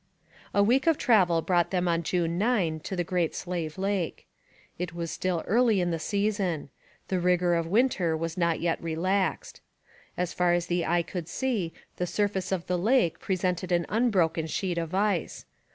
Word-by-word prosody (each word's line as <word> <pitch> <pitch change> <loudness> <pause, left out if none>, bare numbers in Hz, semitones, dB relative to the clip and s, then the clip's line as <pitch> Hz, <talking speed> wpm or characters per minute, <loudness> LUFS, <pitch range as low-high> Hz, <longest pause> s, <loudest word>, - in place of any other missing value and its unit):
A 200 - +3
week 255 +8 +2
of 325 -3 +4
travel 180 -9 +3
brought 175 -2 +2
them 180 -1 0
on 170 -1 +1
June 170 0 -1
9 195 -8 +1
to 190 - -5
the 175 - 0
Great 175 -1 -1
Slave 170 -3 -4
Lake. 195 -3 -2 0.5
It 175 -1 -4
was 170 -1 -4
still 180 -3 -1
early 225 -1 +3
in 175 -1 0
the 165 - -2
season. 200 -5 -1 0.4
The 185 - +1
rigour 180 0 +2
of 165 -1 0
winter 190 -6 +2
was 165 0 -3
not 170 -2 +1
yet 170 -1 -1
relaxed. 185 +4 -1 0.6
As 180 -1 -1
far 180 -1 +2
as 175 -1 +1
the 175 -1 -1
eye 175 0 +2
could 170 -1 -6
see 225 -10 -1 0.3
the 180 - -1
surface 195 -1 -1
of 185 -3 -1
the 180 -1 -1
lake 220 -3 +2
presented 185 -1 -1
an 170 -1 +2
unbroken 185 -8 +1
sheet 175 +1 -2
of 165 +2 -4
ice. 200 -3 0
180 Hz, 180 wpm, -27 LUFS, 170-195 Hz, 0.6 s, of